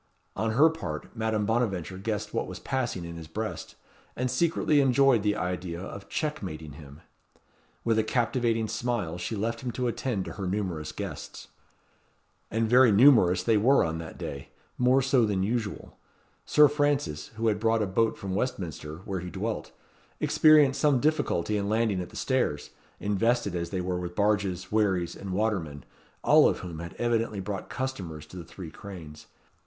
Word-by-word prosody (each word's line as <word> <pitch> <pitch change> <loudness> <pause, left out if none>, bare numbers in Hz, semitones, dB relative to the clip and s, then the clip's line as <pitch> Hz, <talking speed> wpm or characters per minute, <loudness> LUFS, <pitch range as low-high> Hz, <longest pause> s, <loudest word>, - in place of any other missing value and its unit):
On 110 0 -1
her 145 +7 +6
part, 140 - -5
Madame 110 -2 0
Bonaventure 100 -6 -1
guessed 105 0 -3
what - - -1
was - - -7
passing 120 -10 -2
in 85 0 -7
his 80 -1 -9
breast, 110 +7 -5 0.4
and 125 0 -1
secretly 155 -3 +2
enjoyed 135 -3 +4
the 105 0 +1
idea 90 -3 -3
of 100 +2 -8
checkmating 95 - -4
him. 70 0 -12 0.8
With 115 -1 +2
a - - +3
captivating 115 -1 0
smile 110 -7 -2
she 110 - -3
left 115 +3 -2
him 130 - -3
to 125 - -2
attend 120 -4 -2
to - - -6
her 95 -3 -5
numerous 90 -5 -2
guests. - - -7 1.0
And 110 +1 0
very 125 +1 +6
numerous 100 -6 +6
they 110 +2 +3
were 130 +7 +4
on 80 0 -2
that 80 -1 -8
day. 70 -1 -6 0.3
More 125 +2 +4
so 130 -2 +3
than 100 -3 +1
usual. 110 0 -3 0.5
Sir 150 0 +7
Francis, 145 - 0
who 115 +1 -3
had 105 -2 +1
brought 115 0 +2
a - - +1
boat 110 +4 +1
from 95 -1 -5
Westminster, 85 - -3
where 95 -3 -3
he 90 +1 -6
dwelt, 100 - -4 0.5
experienced 150 -3 +5
some 145 -4 +4
difficulty 115 - +1
in 100 0 -2
landing 110 -4 +1
at 90 - -7
the - - -15
stairs, 125 - -1 0.3
invested 105 0 +1
as 85 -1 -2
they 95 -2 -2
were 90 0 -2
with 90 0 -6
barges, 100 -3 0
wherries 95 -5 +1
and 100 - -8
watermen, 90 - -2 0.4
all - - +6
of - - -3
whom 85 -3 -7
had 85 +1 -7
evidently 115 -3 0
brought 100 0 -5
customers 95 - -5
to 80 - -14
the 90 - -6
Three 85 0 -9
Cranes. 80 -5 -10
105 Hz, 170 wpm, -28 LUFS, 90-120 Hz, 1.0 s, Sir